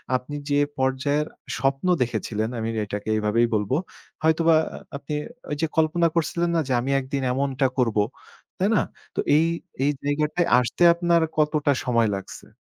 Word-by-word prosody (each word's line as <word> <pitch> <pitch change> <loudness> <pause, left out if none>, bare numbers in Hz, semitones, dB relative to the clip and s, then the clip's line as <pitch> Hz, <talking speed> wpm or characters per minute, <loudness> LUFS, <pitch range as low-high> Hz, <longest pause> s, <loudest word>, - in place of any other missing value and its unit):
আপনি 130 +3 -4
যে 145 0 +3 0.2
পর্যায়ের 135 +3 0 0.3
স্বপ্ন 135 +5 0
দেখেছিলেন, 110 -2 -1
আমি 110 0 -2
এটাকে 105 +1 -5
এইভাবেই 110 +2 +2
বলব। 105 +2 0 0.5
হয়তোবা 160 0 +4 0.4
আপনি 145 +1 -7 0.4
ওই - - 0
যে 160 - +2
কল্পনা 165 +2 +3
করছিলেন 170 +1 0
না? - - +3
যে, - - -3
"আমি 135 +2 -2
একদিন 135 +1 -3
এমনটা 135 0 0
করব।" 115 -4 +1 0.6
তাই 195 +3 +2
না? - - +4 0.3
তো - - -3 0.2
এই, 160 +2 +4 0.4
এই 145 - +3
জায়গাটায় 150 +4 0
আসতে 125 +8 0
আপনার 170 -1 +2 0.2
কতটা 150 -1 +2
সময় 115 -3 +2
লাগছে? 95 - -9
140 Hz, 150 wpm, -24 LUFS, 120-160 Hz, 0.6 s, হয়তোবা